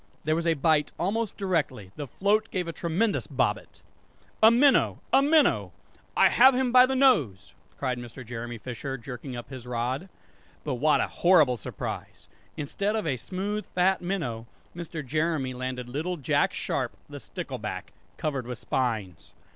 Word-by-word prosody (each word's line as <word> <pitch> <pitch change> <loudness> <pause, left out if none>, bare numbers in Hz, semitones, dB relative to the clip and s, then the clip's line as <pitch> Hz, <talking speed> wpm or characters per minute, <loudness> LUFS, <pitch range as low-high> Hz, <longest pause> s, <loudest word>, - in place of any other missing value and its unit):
There 155 +1 +1
was 170 +1 -1
a 165 - +3
bite 150 0 +2
almost 210 +4 -1
directly; 150 - -1
the 145 - -5
float 210 - +1
gave 180 -3 -2
a 165 - -4
tremendous 185 +7 0
bobbit! - - -2 0.6
"A 220 - +9
minnow! 255 +4 +4 0.2
a 270 - +7
minnow! 300 +1 +3 0.4
I - - +6
have 260 +1 +6
him 255 -1 +1
by 250 +1 +7
the 265 - -1
nose!" 165 - +2 0.2
cried 130 -3 -2
Mr. 120 +1 -9
Jeremy 120 0 -6
Fisher, 130 +4 -5
jerking 125 +1 -7
up 120 +3 -8
his 125 -2 -8
rod. 125 +8 -2 0.5
But 145 - -2
what 155 0 +4
a - - 0
horrible 160 -8 +4
surprise! 115 - -7 0.3
Instead 200 +8 -2
of 220 - -1
a 130 - 0
smooth 195 - -4
fat 185 +1 +2
minnow, 160 -12 -3 0.3
Mr. 165 -3 -6
Jeremy 155 -1 -1
landed 125 0 -4
little 160 +8 -3
Jack 140 - +1
Sharp - - -2
the - - -8
stickleback, - - -6 0.2
covered 140 -5 -2
with 125 -2 -5
spines! 110 -10 -3
155 Hz, 160 wpm, -27 LUFS, 125-195 Hz, 0.6 s, A